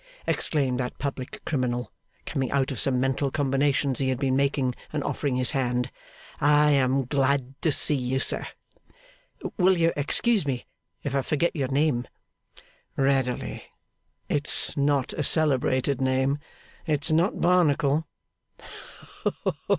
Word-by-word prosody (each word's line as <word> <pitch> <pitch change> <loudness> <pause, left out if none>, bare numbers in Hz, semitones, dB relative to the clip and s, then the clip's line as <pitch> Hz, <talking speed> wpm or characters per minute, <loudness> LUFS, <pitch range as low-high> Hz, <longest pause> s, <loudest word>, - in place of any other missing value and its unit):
exclaimed 135 -5 +1
that 125 -1 -3
public 135 -2 -5
criminal, 125 -4 -2 0.3
coming 135 -4 -2
out 140 0 0
of 130 - -4
some 130 -2 +1
mental 135 +2 0
combinations 140 -1 0
he 135 -1 0
had 130 - 0
been 130 -1 0
making, 135 -2 +1 0.2
and 150 -2 -2
offering 140 -4 -2
his 125 -1 +2
hand. 125 -2 -1 0.5
'I 150 +1 +4
am 135 -1 +2
glad 135 0 0
to 160 - +2
see 150 - +3
you, 130 -1 -1
sir. - - 0 1.1
Will 185 -1 +4
you 165 0 +2
excuse 205 +9 +2
me 130 -4 -3 0.4
if 140 - -3
I 135 - +2
forget 160 +6 0
your 140 -4 -1
name?' 135 -2 0 0.9
'Readily. 135 -2 0 0.7
It's 145 +1 +2
not 140 -2 +1
a - - -3
celebrated 135 -3 +2
name. 130 +2 +1 0.5
It's 150 -1 0
not 170 +6 +2
Barnacle. 160 -4 +2
140 Hz, 130 wpm, -26 LUFS, 130-150 Hz, 1.1 s, I